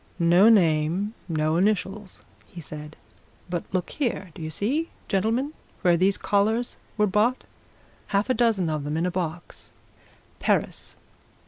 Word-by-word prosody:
"No 175 +4 +6
name 175 0 +3 0.2
no 155 0 +1
initials," 200 +1 -1 0.2
he 180 - -11
said. 150 0 -9 0.6
"But 175 -2 -2
look 185 -2 -2
here 225 - -2
do - - -10
you 155 - -4
see, 265 - -1 0.2
gentlemen, 230 +9 0 0.3
where 175 -2 +5
these 190 +3 +2
collars 220 +4 +1 0.2
were 210 - +4
bought? 210 +6 +1 0.6
Half 200 +2 +1
a 255 - +2
dozen 220 -7 +2
of 155 -2 -2
them, 150 +2 -2
in 165 - 0
a 180 - 0
box. 175 -1 -5 0.7
Paris! - - -1
190 Hz, 140 wpm, -25 LUFS, 165-215 Hz, 0.7 s, No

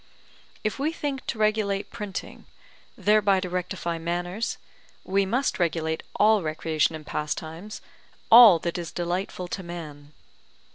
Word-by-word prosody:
If 215 +4 -2
we 300 +3 0
think 285 -5 -4
to - - -2
regulate 215 -2 0
printing, 210 -4 -7 0.5
thereby 205 -2 +3
to 180 -2 -5
rectify 180 -2 -3
manners, 175 +6 -3 0.5
we 195 +1 +1
must 250 +4 0
regulate 160 -2 0
all 215 0 +4
recreation 160 0 0
and 155 -1 -9
pastimes, 160 +7 -5 0.5
all 225 -6 +10
that 170 +1 -3
is 170 -3 -6
delightful 180 +1 -3
to 190 - -4
man. 155 -5 -9
180 Hz, 130 wpm, -26 LUFS, 165-215 Hz, 0.5 s, all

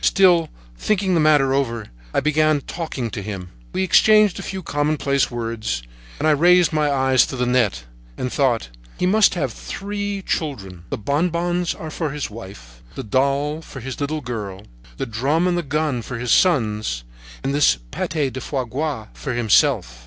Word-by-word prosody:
Still 175 -4 +4 0.3
thinking 195 -3 +1
the 170 - +3
matter 145 -3 +4
over, 115 -5 -1 0.2
I - - +1
began 155 0 +2
talking 135 -8 -4
to 100 - -4
him. 95 -3 -6 0.2
We - - -1
had 190 - -1
exchanged 215 -2 +5
a - - -4
few 190 -1 -5
commonplace 145 -2 0
words; 115 - -3 0.3
and 155 - 0
I - - +5
raised 175 +3 +5
my 150 -1 +2
eyes 130 -2 +3
to - - -5
the 125 -1 0
net, 120 - +1 0.3
and 125 - -3
thought: 125 - +1 0.3
"He - - 0
must 205 +1 +4
have 135 -9 -2
three 205 - -4
children: 95 - -4
the - - -2
bonbons 170 - 0
are 160 -1 -7
for 160 0 -2
his 145 -5 -4
wife, 65 - -11
the - - -5
doll 140 +7 0
for 140 - -10
his 130 +3 -6
little 150 +2 -2
girl, 105 -6 -5 0.3
the - - -2
drum 135 +9 0
and 180 - +1
the 175 - 0
gun 150 -4 -1
for 125 +1 -6
his 120 0 -2
sons, 110 - +2 0.4
and 135 - -1
this 145 - +4
pate 150 -5 -2
de 130 - -4
foies 130 -4 -3
gras 140 -5 -2
for 135 - -5
himself." 100 - +2
140 Hz, 180 wpm, -21 LUFS, 115-160 Hz, 0.4 s, exchanged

